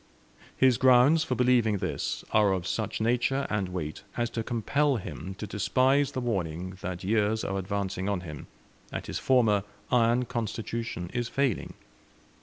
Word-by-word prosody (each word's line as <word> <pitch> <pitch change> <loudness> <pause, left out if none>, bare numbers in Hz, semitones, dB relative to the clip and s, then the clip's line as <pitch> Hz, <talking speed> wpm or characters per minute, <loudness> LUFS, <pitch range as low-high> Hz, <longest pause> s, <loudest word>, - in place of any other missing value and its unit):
His 130 -3 +4
grounds 130 +5 +6
for 130 - -2
believing 120 -4 +3
this 95 -1 -3
are 105 -3 +4
of 90 -2 -2
such 110 +2 -2
nature 125 +4 +1
and 100 -3 -1
weight 80 -4 -5 0.2
as 120 -1 0
to 115 - -2
compel 130 +5 +1
him 95 - -6
to 105 - -5
despise 130 +7 +2
the - - -2
warning 90 -5 -2
that 90 0 -5
years 110 +2 +1
are 95 0 -2
advancing 95 0 -2
on 100 -3 -1
him, 75 -5 -8 0.4
and - - -5
his - - -4
former 115 -6 +3 0.3
iron 120 +1 +3
constitution 115 -5 -4
is 120 -1 -2
failing. 135 -6 -1
110 Hz, 155 wpm, -28 LUFS, 95-125 Hz, 0.4 s, grounds